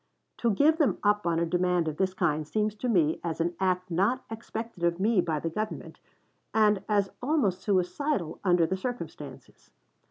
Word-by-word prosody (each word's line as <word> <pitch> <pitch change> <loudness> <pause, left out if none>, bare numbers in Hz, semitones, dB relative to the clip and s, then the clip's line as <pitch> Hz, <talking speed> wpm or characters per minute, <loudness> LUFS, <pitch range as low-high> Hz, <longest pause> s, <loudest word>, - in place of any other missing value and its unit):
To 235 - +1
give 295 - +3
them 300 - +3
up 205 -2 +2
on 165 -1 +1
a 170 - +1
demand 180 0 +1
of 155 -1 -3
this 190 -1 0
kind 155 -4 0
seems 215 +3 0
to 230 +4 -3
me 165 -8 +2
as 165 -1 -3
an 170 +1 0
act 185 -1 0
not 205 +10 +1
expected 225 -3 -6
of 170 0 +1
me 210 -1 +3
by 160 -3 -1
the 165 +2 -3
Government, 215 +5 -5 0.6
and 210 -3 +3
as 200 -2 +2
almost 245 - +1
suicidal 195 - -1
under 175 -3 +4
the 190 +4 -2
circumstances. 245 +5 -7
190 Hz, 180 wpm, -28 LUFS, 170-220 Hz, 0.6 s, under